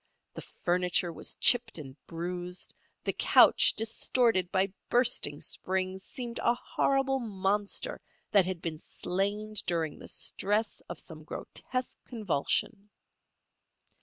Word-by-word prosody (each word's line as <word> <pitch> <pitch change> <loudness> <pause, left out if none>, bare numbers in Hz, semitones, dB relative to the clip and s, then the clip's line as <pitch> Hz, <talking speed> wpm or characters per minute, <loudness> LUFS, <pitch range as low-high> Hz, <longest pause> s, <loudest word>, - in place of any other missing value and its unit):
The - - -7
furniture 180 -1 0
was - - -4
chipped 240 -4 +4
and 135 -4 -8
bruised; 175 +2 -4 0.3
the - - 0
couch, - - +6
distorted 225 -3 +2
by 190 0 +1 0.2
bursting 240 - +2
springs, 190 0 -2
seemed 240 +1 -5
a 235 - +3
horrible 270 +2 +1
monster 205 - -2 0.3
that 195 -3 +5
had 185 -2 -4
been 160 -2 -2
slain 205 +6 -2
during 165 -3 -1
the - - -10
stress 210 +2 -1
of - - -5
some 155 -2 -9
grotesque 255 +9 -4
convulsion. 210 - -1
195 Hz, 115 wpm, -30 LUFS, 175-230 Hz, 0.3 s, couch